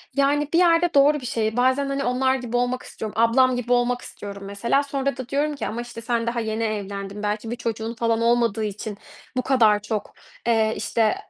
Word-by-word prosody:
Yani, 285 +1 +2
bir - - +4
yerde 345 -1 +4
doğru 285 +2 +5
bir - - -8
şey. 220 -1 -1
Bazen, 260 +3 +2
hani, 275 0 -1
onlar 260 +1 +2
gibi 245 -2 -2
olmak 245 +1 0
istiyorum. 215 -1 -7
Ablam 250 +3 +4
gibi 245 0 -3
olmak 245 0 +1
istiyorum 200 -1 -8
mesela 215 +8 0
sonra 275 0 -2
da 260 -1 -7
diyorum 290 +1 0
ki, 240 - -4
"Ama, 235 +2 -3
işte, 240 -1 -8
sen 235 0 -1
daha 235 0 -1
yeni 220 0 -2
evlendin. 200 -1 -4
Belki 210 +2 -2
bir 240 - -2
çocuğun 230 -1 -3
falan 230 0 0
olmadığı 235 -2 +2
için 210 0 -5 0.4
bu - - +3
kadar 225 -6 +4
çok, 210 -1 -4 0.3
eee, 220 -2 +3
işte, 220 -2 +1
235 Hz, 200 wpm, -23 LUFS, 220-260 Hz, 0.4 s, doğru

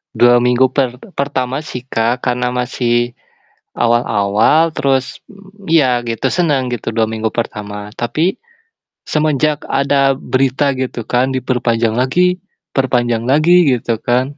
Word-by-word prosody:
2 120 0 +5
minggu 125 +2 +3
per 125 -3 -1 0.2
pertama 135 -1 -2
sih, 125 - -6
Kak, 115 +3 0
karena 125 0 -1
masih 120 -1 -1 0.6
awal-awal, 115 +6 +2
terus, 135 -1 -1
mmm, 200 0 -17
ya 130 -7 +3
gitu, 115 -1 -2
senang 145 -8 +1
gitu, 115 -1 -4
2 110 0 +2
minggu 110 0 -2
pertama. 105 -2 -5
Tapi 155 +10 0 0.7
semenjak 150 -1 0
ada 140 0 +2
berita, 135 +1 0
gitu 130 -2 -3
kan, 130 +2 0
diperpanjang 120 -3 0
lagi, 180 +9 +2 0.4
perpanjang 120 -3 0
lagi, 155 +3 +4
gitu 115 -1 -2
kan, 130 +4 -1
125 Hz, 125 wpm, -16 LUFS, 120-140 Hz, 0.7 s, 2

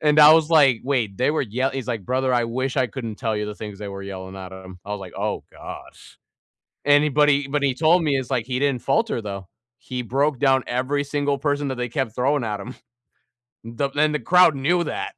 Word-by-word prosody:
And 150 0 +3
I 150 0 +10
was 160 -1 +2
like, 140 -8 +5
"Wait, 120 -8 -1
they 125 - +2
were 155 - 0
yell" 130 +4 -1
he's 135 -2 -5
like, 115 -5 -3
"Brother, 130 +3 0
I 120 - +2
wish 130 +4 -3
I 130 -2 +2
couldn't 115 -1 -6
tell 110 -3 -2
you 105 0 -2
the 105 - -6
things 105 -2 -8
they 105 - -6
were 100 0 -7
yelling 95 -1 -8
at 95 -1 -8
him." 95 -1 -11
I 105 - -9
was 105 - -3
like, 95 -2 -9
"Oh - - -3
gosh." - - -12 0.7
And 145 0 +5
he - - +2
but 150 +1 +3
he 140 -1 +2
but 145 0 -1
he 135 -2 +1
told 165 +6 +3
me 145 -3 +1
it's 130 -1 -5
like 125 -4 0
he 125 -1 -2
didn't 140 -3 0
falter 225 - 0
though, 100 -3 -7 0.3
he 125 -1 -5
broke 135 +3 0
down 135 -1 +3
every 130 +4 -1
single 145 0 -1
person 145 0 -1
that 130 - -3
they 125 0 -3
kept 120 -3 -3
throwing 135 +1 +1
at 105 -2 -3
him. 125 +6 -8 0.9
The 115 +5 -3
and 150 +1 +2
the 150 - 0
crowd 180 -1 +5
knew 170 +6 +1
that. - - -4
130 Hz, 240 wpm, -22 LUFS, 110-145 Hz, 0.9 s, I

